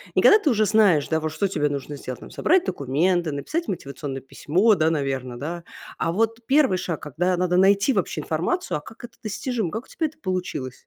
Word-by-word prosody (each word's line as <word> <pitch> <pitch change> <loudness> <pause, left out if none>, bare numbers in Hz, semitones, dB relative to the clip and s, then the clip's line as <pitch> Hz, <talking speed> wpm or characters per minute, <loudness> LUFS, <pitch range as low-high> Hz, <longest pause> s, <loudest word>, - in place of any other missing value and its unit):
Не - - +4
когда 425 - +7
ты 320 - +1
уже 215 -4 +3
знаешь, 200 -8 +4
да, 160 - +1
вот 155 0 -3
что 200 +5 0
тебе 150 -6 0
нужно 145 +1 -4
сделать, 130 -2 -7
там - - -11
собрать 370 +2 +2
документы, 160 +5 0
написать 315 - -3
мотивационное 140 -5 -5
письмо, 185 +10 +2
да, 160 -3 +2
наверно, 135 -5 -2
да? 170 +5 -5 0.3
А 165 - 0
вот 225 +5 0
1 270 -7 +3
шаг, 170 -3 -4
когда 175 +5 -1
надо 180 0 +1
найти 200 +7 +4
вообще 190 -4 -1
информацию, 180 - -1
а 150 - -8
как 225 - -14
это 240 - -16
достижимо, 220 -3 -2
как 225 +4 -5
у - - -24
тебя 320 - -2
это - - -15
получилось? 180 -9 -3
180 Hz, 210 wpm, -24 LUFS, 150-220 Hz, 0.3 s, когда